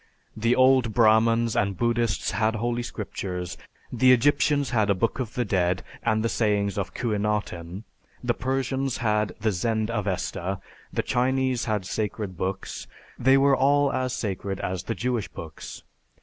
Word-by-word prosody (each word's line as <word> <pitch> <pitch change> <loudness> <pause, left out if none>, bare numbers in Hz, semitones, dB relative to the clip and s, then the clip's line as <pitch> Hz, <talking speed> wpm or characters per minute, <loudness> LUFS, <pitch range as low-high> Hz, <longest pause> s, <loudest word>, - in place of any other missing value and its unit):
The 115 +2 +2
old 130 -4 +4
Brahmans 115 0 +4
and 100 -2 0
Buddhists 120 -2 0
had 110 +2 +1
Holy 120 +2 -1
Scriptures; 90 -6 -5 0.4
the 130 +1 +5
Egyptians 140 +2 +3
had 110 -4 +2
a 100 - +4
Book 115 +8 -1
of 125 -2 -4
the 125 - 0
Dead, 90 -2 +1 0.2
and 110 -1 +1
the - - +2
Sayings 105 -3 +1
of 100 -2 -4
Khuenaten; 105 -5 -2 0.4
the 120 -1 +1
Persians 135 +1 -1
had 105 -4 0
the 110 0 +1
Zend 110 +4 -1
Avesta; 95 -3 -2 0.3
the - - -1
Chinese 130 0 +1
had 105 -4 -1
sacred 105 -2 -3
books. 95 +2 -4 0.3
They 130 +2 +5
were 135 0 +5
all 140 +1 +3
as 130 0 -1
sacred 100 -3 -3
as 90 0 -3
the 115 - -2
Jewish 120 -4 -1
books. 80 -2 -9
110 Hz, 150 wpm, -25 LUFS, 100-125 Hz, 0.4 s, the